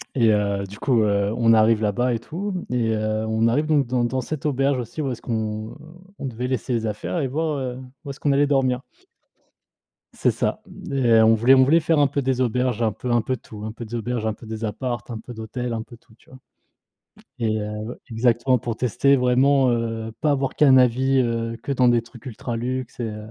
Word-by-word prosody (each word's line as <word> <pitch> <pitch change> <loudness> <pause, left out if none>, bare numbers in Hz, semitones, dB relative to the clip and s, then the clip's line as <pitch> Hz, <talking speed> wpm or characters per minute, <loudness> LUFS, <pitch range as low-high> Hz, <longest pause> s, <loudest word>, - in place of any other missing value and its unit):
et 115 -4 +4
heu, 100 -1 0
du 100 +2 -12
coup, 120 -5 +2
heu, 100 -1 +1
on 115 -1 +4
arrive 110 0 +4
là-bas 120 +4 +1
et - - -3
tout 180 - -5
et 115 -3 +1
heu, 110 0 -1
on 110 +1 +2
arrive 145 +7 +1
donc 150 -3 +3
dans 120 0 0
dans 130 +2 -1
cette 150 +3 -6
auberge 135 -1 +1
aussi 120 +6 -5
où 135 - -1
est-ce 120 - -6
qu'on 110 -1 -4 0.4
on - - -6
devait 125 -1 -4
laisser 130 0 -2
les 115 -1 -1
affaires 105 - -3
et 140 - 0
voir, 155 +3 -1
heu, 125 -1 -4 0.3
où - - -6
est-ce 140 - -7
qu'on 145 - +1
allait 140 +1 +3
dormir. 130 -3 +1 1.3
C'est - - +1
ça - - -2 0.3
et - - -4
heu, 115 -1 +6
on 110 0 +6
voulait 120 +4 +5
on 130 -1 +7
voulait 155 +6 +4
faire 160 -1 +1
un 145 - +5
peu 140 +1 -2
des 130 0 0
auberges, 125 -1 0
un 110 -2 +2
peu 125 +4 -5
un 120 0 +3
peu 130 +2 -2
tout, 105 -1 -11
un 110 - -4
peu 115 +1 -8
d'auberge, 115 0 -3
un 110 - 0
peu 110 - -13
des 110 0 -6
apparts, 120 +2 -3
un 115 -2 -5
peu 120 - -10
d'hôtel, 120 +3 -5
un 115 -1 -3
peu 120 0 -14
tout, 115 -1 -24
tu 120 - -24
vois? 130 - -13 1.0
Et 110 -1 0
heu, 105 +2 -5
exactement 120 +2 +2
pour 115 -1 -4
tester 140 +4 +2
vraiment, 130 +1 +3
heu, 115 -1 -3
pas 150 - +2
avoir 135 -2 0
qu'un 135 -3 +5
avis, 130 +2 +3
heu, 115 -1 -1
que 140 - -3
dans 125 -2 +3
des 120 -1 +3
trucs 120 +1 -16
ultra 120 0 -5
luxe, 125 +1 -4
heu, 120 - -1
et 105 - -7
120 Hz, 230 wpm, -23 LUFS, 110-130 Hz, 1.3 s, on